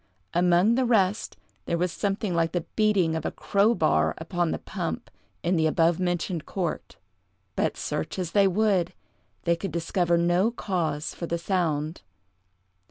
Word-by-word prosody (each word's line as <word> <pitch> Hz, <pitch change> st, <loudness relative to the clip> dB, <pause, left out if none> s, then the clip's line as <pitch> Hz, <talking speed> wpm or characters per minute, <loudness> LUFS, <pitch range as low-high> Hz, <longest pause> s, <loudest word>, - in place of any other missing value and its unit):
Among 180 Hz, +5 st, +4 dB
the 260 Hz, +2 st, +2 dB
rest, 215 Hz, -4 st, +1 dB, 0.3 s
there 170 Hz, -, 0 dB
was 180 Hz, +1 st, 0 dB
something 200 Hz, +1 st, -1 dB
like 165 Hz, -1 st, +1 dB
the 175 Hz, -2 st, -1 dB
beating 200 Hz, -7 st, +3 dB
of 160 Hz, -, -2 dB
a -, -, -1 dB
crow 205 Hz, +4 st, +2 dB
bar 80 Hz, -, +2 dB
upon 175 Hz, +1 st, -1 dB
the -, -, -1 dB
pump -, -, -5 dB, 0.3 s
in 175 Hz, +1 st, +2 dB
the 160 Hz, -1 st, +3 dB
abovementioned 170 Hz, +1 st, +1 dB
court; 180 Hz, -4 st, -3 dB, 0.6 s
but, -, -, 0 dB
search 80 Hz, -, -3 dB
as 180 Hz, -3 st, -3 dB
they 200 Hz, -1 st, +5 dB
would, 195 Hz, -2 st, +1 dB, 0.5 s
they 170 Hz, 0 st, +2 dB
could 190 Hz, +3 st, -5 dB
discover 170 Hz, +1 st, +1 dB
no 175 Hz, +5 st, +3 dB
cause 165 Hz, -9 st, -2 dB
for 170 Hz, -, -5 dB
the 170 Hz, -, -1 dB
sound. 165 Hz, -4 st, -1 dB
175 Hz, 155 wpm, -26 LUFS, 165-195 Hz, 0.6 s, they